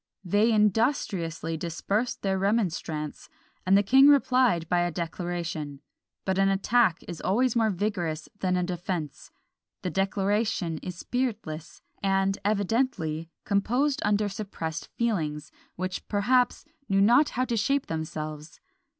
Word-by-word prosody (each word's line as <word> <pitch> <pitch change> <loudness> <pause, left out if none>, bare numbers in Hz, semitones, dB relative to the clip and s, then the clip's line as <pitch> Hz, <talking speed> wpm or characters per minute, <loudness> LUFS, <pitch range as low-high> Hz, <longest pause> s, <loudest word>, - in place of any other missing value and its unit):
They 205 +6 +3
industriously 205 - +1
dispersed 195 +8 -2
their 190 -1 +1
remonstrance, 175 -7 -1 0.4
and 195 +1 +6
the 200 - +4
king 265 +7 +6
replied 255 - +4
by 175 +1 +2
a 175 0 +1
declaration; 170 -3 -4 0.5
but 190 0 0
an 195 0 +4
attack 195 -1 +2
is 170 - -6
always 240 +6 +1
more 225 -2 +3
vigorous 180 -5 -2
than 185 -1 +1
a 180 - +1
defence. 175 -4 -4 0.5
The 180 - -2
declaration 195 -3 0
is 180 - -6
spiritless, 210 -11 -4 0.2
and 195 0 +1
evidently 200 -6 0 0.2
composed 245 +8 +1
under 210 0 +2
suppressed 195 -6 -5
feelings, 165 -10 -1 0.2
which, 185 +1 -4
perhaps, 245 +7 +2 0.2
knew 195 0 +3
not 245 +9 +5
how 255 - +2
to 240 - -1
shape 275 +6 +1
themselves. 155 -1 -5
195 Hz, 125 wpm, -27 LUFS, 170-220 Hz, 0.5 s, and